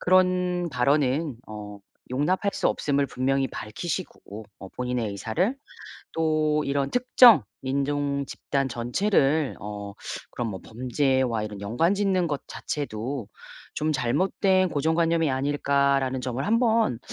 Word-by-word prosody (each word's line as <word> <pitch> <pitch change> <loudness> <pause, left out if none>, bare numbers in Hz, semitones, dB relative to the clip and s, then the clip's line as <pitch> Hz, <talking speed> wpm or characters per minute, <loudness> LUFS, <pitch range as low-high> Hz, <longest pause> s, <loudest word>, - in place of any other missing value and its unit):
그런 180 -1 +2
발언은어 125 -6 -1 0.3
용납할 180 +10 0
수 - - +1
없음을 140 -1 0
분명히 135 +1 0
밝히시고 110 - -6 0.2
어 95 - -8
본인의 125 -3 -2
의사를 115 - -1 0.6
또 155 -1 +1
이런 140 0 0
'특정 245 - +6 0.2
인종 140 +1 -1
집단 135 -1 -2
전체를 135 - +1
어 105 -1 -6 0.4
그런 120 -2 -3
뭐 95 -3 -6
범죄와 125 -1 0
이런 105 -2 -6
연관 120 - +1
짓는 190 -3 +1
것 145 -3 -3
자체도 130 -3 -4 0.5
좀 155 +1 -1
잘못된 185 - +2
고정관념이 160 0 +1
아닐까.'라는 140 -1 +1
점을 125 +3 -3
1 230 +3 +3
번 225 - +2
140 Hz, 255 characters per minute, -26 LUFS, 125-170 Hz, 0.6 s, 특정